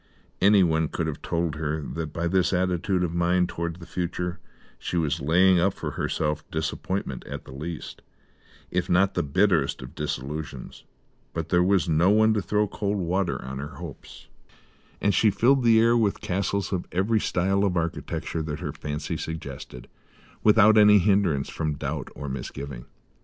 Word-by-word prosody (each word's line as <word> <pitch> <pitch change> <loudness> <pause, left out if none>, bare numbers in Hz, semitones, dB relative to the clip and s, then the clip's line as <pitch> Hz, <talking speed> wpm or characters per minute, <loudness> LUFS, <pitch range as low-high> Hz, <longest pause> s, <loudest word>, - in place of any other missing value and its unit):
Anyone 90 -6 +4
could 85 - -3
have 80 -2 -4
told 85 -3 -2
her 80 0 -2
that, 75 +1 -5
by 85 +2 -2
this 95 +1 +2
attitude 90 +1 +1
of 85 -2 -2
mind 90 +1 +2
towards 85 0 -4
the 85 - -10
future, 90 -1 -3 0.4
she 90 - -3
was 75 -2 0
laying 90 +5 +4
up 95 +3 +2
for - - -4
herself 75 -1 -2
disappointment 80 -2 -3
at - - -7
the - - -11
least, 80 +4 -7 0.7
if - - -1
not 95 +2 +3
the - - 0
bitterest 80 -4 +1
disillusions; 70 0 -5 0.5
but 80 -1 -4
there 90 +1 +4
was 95 -2 +2
no 85 +3 +3
one 110 +1 +5
to 105 - 0
throw 105 +3 +1
cold 100 +1 -2
water 90 0 -1
on 65 +1 -5
her 75 +3 -7
hopes, 85 -5 -10 0.7
and 100 - +2
she 110 - +4
filled 130 +6 +3
the 115 -1 +6
air 115 +1 +4
with 110 -4 +1
castles 100 +1 -2
of 90 - -2
every 105 +5 +1
style 95 +1 +1
of 95 -3 +1
architecture 85 0 -3
that 75 -1 -4
her - - -4
fancy 75 0 -4
suggested, 70 -6 -7 0.5
without 110 0 +6
any 105 0 +7
hindrance 95 -8 +2
from 75 -2 -3
doubt 70 -1 -4
or 75 - -6
misgiving. 65 -1 -6
85 Hz, 165 wpm, -25 LUFS, 75-100 Hz, 0.7 s, any